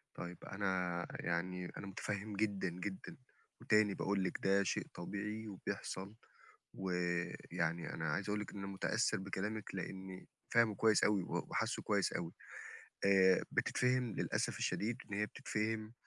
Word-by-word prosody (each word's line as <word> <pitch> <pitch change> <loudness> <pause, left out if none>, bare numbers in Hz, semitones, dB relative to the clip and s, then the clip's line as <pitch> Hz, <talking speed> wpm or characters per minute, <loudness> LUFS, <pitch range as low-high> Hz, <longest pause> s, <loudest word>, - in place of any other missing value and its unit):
طيب، 85 0 -5
أنا 90 -3 0
يعني 90 +1 -1
أنا 100 - -6
متفهّم 100 +2 -3
جدًا، 100 -2 +1
جدًا، 90 +2 -5 0.4
وتاني 105 -1 +4
باقول 100 0 +1
لِك 95 - -1
ده 100 +1 +5
شيء - - 0
طبيعي 105 +5 -4
وبيحصل، 95 0 -4 0.6
ويعني 85 -2 -1
أنا 80 -1 -1
عايز 100 +6 -1
أقول 105 0 +1
لِك 105 - -6
إن - - -7
أنا 100 - -4
متأثّر 105 +3 +1
بكلامِك 100 +2 -3
لإني 95 0 -5 0.2
فاهمُه 115 -3 +5
كويس 110 0 +5
أوي 105 -3 +4
و - - -2
وحاسُّه - - 0
كويس - - +2
أوي، 85 -1 -2 0.7
آآ، 95 -1 +6
بتتفهِم 125 -2 +2
للأسف - - 0
الشديد 115 +3 0
إن - - -9
هي 105 - +2
بتتفهِم 110 +1 -2
100 Hz, 140 wpm, -37 LUFS, 90-105 Hz, 0.7 s, آآ